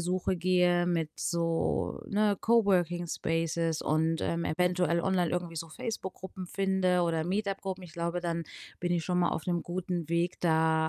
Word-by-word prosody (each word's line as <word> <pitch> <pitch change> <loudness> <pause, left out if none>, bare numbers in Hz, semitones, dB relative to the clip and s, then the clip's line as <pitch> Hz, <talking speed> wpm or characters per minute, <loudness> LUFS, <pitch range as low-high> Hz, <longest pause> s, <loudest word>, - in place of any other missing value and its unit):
Suche 180 +2 0
gehe 180 0 +3
mit 165 -3 0
so, 165 -1 0
ne, 205 0 +2
Coworking-Spaces 170 -6 +1
und, 160 +1 +1
ähm, 170 0 -1
eventuell 180 0 +1
online 180 -2 +1
irgendwie 175 -2 -3
so 165 +1 -4
Facebook-Gruppen 190 -3 -6
finde 190 -2 +1
oder 165 -2 0
Meetup-Gruppen, 195 0 -2
ich 165 - -12
glaube, 170 +1 -2
dann 170 -1 -2 0.4
bin 175 0 0
ich 170 -2 0
schon 180 -1 0
mal 175 - +3
auf 160 - -3
'nem 175 -1 0
guten 175 -2 -3
Weg, 170 +2 0
da, 160 -1 +3
175 Hz, 155 wpm, -30 LUFS, 165-185 Hz, 0.4 s, gehe